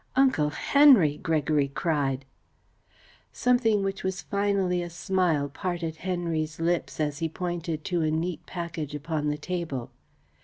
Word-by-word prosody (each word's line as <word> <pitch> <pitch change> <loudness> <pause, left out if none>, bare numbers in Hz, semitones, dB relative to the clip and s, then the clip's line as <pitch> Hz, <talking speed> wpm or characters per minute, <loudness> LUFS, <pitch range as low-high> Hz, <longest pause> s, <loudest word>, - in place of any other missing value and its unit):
"Uncle 260 - +3
Henry!" 245 - +5
Gregory 150 -2 +1
cried. 140 -2 -1 1.1
Something 230 -5 +2
which 195 0 -3
was 190 -1 -2
finally 200 -3 0
a 175 - -5
smile 175 -4 0
parted 165 +1 -4
Henry's 165 -3 -2
lips, 170 0 -1
as 150 -1 -1
he 165 -1 -1
pointed 170 -2 -3
to 175 -2 0
a 155 - +1
neat 160 +2 -2
package 165 -4 -5
upon 150 0 -2
the 150 0 0
table. 155 -6 -4
170 Hz, 130 wpm, -27 LUFS, 150-185 Hz, 1.1 s, Henry